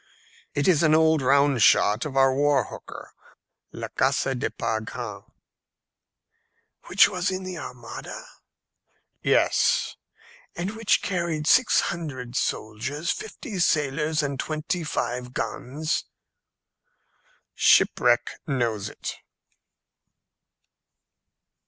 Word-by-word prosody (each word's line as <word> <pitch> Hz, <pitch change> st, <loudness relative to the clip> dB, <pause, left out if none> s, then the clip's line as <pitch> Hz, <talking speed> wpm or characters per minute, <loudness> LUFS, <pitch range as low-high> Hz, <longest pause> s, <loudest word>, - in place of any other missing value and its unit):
"It 145 Hz, -, +1 dB
is 175 Hz, -5 st, +4 dB
an 155 Hz, -2 st, +4 dB
old 160 Hz, -1 st, +4 dB
round 140 Hz, -1 st, +3 dB
shot 105 Hz, +3 st, +4 dB
of 135 Hz, -2 st, -5 dB
our 135 Hz, 0 st, +5 dB
war 145 Hz, 0 st, +2 dB
hooker, -, -, -10 dB, 0.6 s
La -, -, -6 dB
Casse 135 Hz, 0 st, +1 dB
de 125 Hz, -, -2 dB
Par 110 Hz, 0 st, -2 dB
Grand." 110 Hz, -, -7 dB, 1.7 s
"Which -, -, +6 dB
was 180 Hz, -1 st, -1 dB
in 185 Hz, 0 st, -4 dB
the 185 Hz, -2 st, -6 dB
Armada?" 120 Hz, -5 st, -8 dB, 1.0 s
"Yes." -, -, +2 dB, 0.6 s
"And 180 Hz, +3 st, -3 dB
which 225 Hz, -2 st, +1 dB
carried 170 Hz, -5 st, -2 dB
six 255 Hz, +9 st, +5 dB
hundred 130 Hz, -8 st, -5 dB
soldiers, 135 Hz, +9 st, -2 dB
fifty 295 Hz, -, -6 dB
sailors, 150 Hz, -1 st, +1 dB
and 140 Hz, -2 st, -3 dB
twenty 160 Hz, +4 st, -2 dB
five 125 Hz, -4 st, -3 dB
guns?" 155 Hz, +5 st, -3 dB, 1.5 s
"Shipwreck -, -, +3 dB
knows 120 Hz, -7 st, -1 dB
it." -, -, -7 dB
145 Hz, 100 wpm, -25 LUFS, 130-165 Hz, 1.7 s, Which